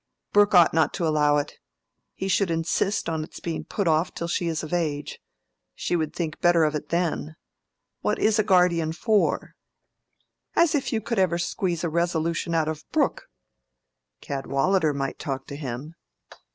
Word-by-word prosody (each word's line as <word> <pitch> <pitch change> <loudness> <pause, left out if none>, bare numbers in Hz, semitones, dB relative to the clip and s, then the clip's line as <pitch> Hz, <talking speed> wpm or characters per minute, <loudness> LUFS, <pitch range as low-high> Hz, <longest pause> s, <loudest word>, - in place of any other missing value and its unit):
"Brooke 205 0 +5
ought 175 -2 +7
not 160 -1 +2
to 175 - -1
allow 150 -1 +3
it: 145 - -4 0.6
he 190 - -3
should 195 0 +2
insist 165 +5 0
on 160 -1 -1
its - - -10
being 165 -2 -4
put 200 -4 -2
off 160 +2 +1
till 170 - -3
she 170 0 -1
is 160 -1 -2
of 155 - -6
age. 150 -4 -2 0.6
She - - -1
would 155 -3 -1
think 165 -3 -3
better 175 -2 +4
of 155 -1 +2
it 150 -1 -4
then. 170 -2 -1 0.6
What - - 0
is 215 0 +2
a - - +4
guardian 180 -5 +3
for?" 215 +4 +1 1.0
"As 340 -1 +4
if 285 -3 0
you 220 - 0
could 230 0 -2
ever 180 -3 +2
squeeze 175 0 -2
a 170 - 0
resolution 170 0 0
out 160 -1 +2
of 155 -1 -4
Brooke!" - - 0 0.9
"Cadwallader 140 +5 0
might 140 -1 -3
talk 135 -2 -4
to 140 - -8
him." 140 +2 -6
165 Hz, 170 wpm, -25 LUFS, 155-180 Hz, 1.0 s, ought